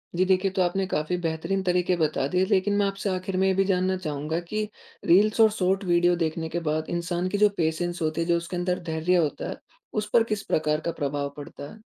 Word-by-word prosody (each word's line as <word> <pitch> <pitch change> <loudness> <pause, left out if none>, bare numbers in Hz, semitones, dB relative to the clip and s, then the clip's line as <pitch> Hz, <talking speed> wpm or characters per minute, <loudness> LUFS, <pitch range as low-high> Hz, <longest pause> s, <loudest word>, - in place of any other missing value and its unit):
जी। 185 +2 +3
देखिए 190 +1 +2
तो 190 - 0
आपने 190 +2 +1
काफ़ी 155 0 -1
बेहतरीन 165 +4 -1
तरीके 180 0 +1
बता 155 -4 0
दिए। 180 +5 +1
लेकिन 200 0 +2
मैं 205 - +3
आपसे 195 0 -2
आखिर 185 0 -2
में 190 +1 +3
ये 190 - +3
भी 195 +1 +3
जानना 185 -1 +1
चाहूँगा 155 -1 -3
कि 215 0 -1 0.4
रील्स 210 +6 +4
और 220 -1 +6
शॉर्ट 195 -1 0
वीडियो 175 -1 +3
देखने 160 -1 -2
के 170 - -2
बाद 155 +1 -1
इंसान 175 +1 -2
की 205 - -1
जो 210 0 +5
पेशेंस 175 +2 -1
होती 155 +1 0
है 165 - -1
जो 170 -1 +3
उसके 170 +1 -5
अंदर 180 0 -1
धैर्य 160 +3 +1
होता 160 -5 0
है - - -5 0.4
उस 210 0 -1
पर 230 - +6
किस 205 - -4
प्रकार 150 -1 0
का 170 - 0
प्रभाव 145 -2 -2
पड़ता 145 0 -9
है? 220 - -16
180 Hz, 230 wpm, -26 LUFS, 160-190 Hz, 0.4 s, और